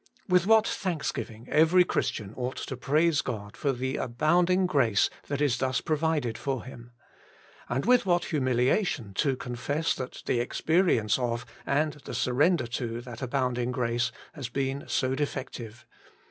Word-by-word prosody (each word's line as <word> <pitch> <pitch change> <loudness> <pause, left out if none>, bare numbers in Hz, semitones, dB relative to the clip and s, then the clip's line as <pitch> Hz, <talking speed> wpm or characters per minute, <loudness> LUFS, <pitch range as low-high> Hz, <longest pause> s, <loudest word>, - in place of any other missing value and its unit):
With 180 -1 +3
what 220 0 +5
thanksgiving 130 - -3
every 165 +4 +6
Christian 110 - -2
ought 125 +1 -3
to 130 - -4
praise 150 +4 +2
God 105 -6 -5
for 140 - 0
the 130 +1 -2
abounding 175 +9 +2
grace 125 - +2 0.2
that 140 0 -2
is 135 -5 +2
thus 130 0 +1
provided 155 -6 0
for 135 -4 -2
him. 120 -2 -11 0.8
And 125 +6 -1
with 250 +1 +5
what 175 -2 +2
humiliation 130 - +1
to 135 -2 +2
con 125 -1 -5
fess 145 +7 0
that 130 0 -7
the 120 - +1
experience 130 - +2
of, 120 -1 -2 0.2
and 150 +1 0
the - - -5
sur 125 - 0
render 150 +2 +3
to, 120 0 -4
that 120 -2 -9
abounding 125 -2 -1
grace 120 -1 0 0.2
has 135 -6 -6
been 135 +2 -2
so 130 -1 0
defective. 130 -5 -4
130 Hz, 155 wpm, -28 LUFS, 120-155 Hz, 0.8 s, every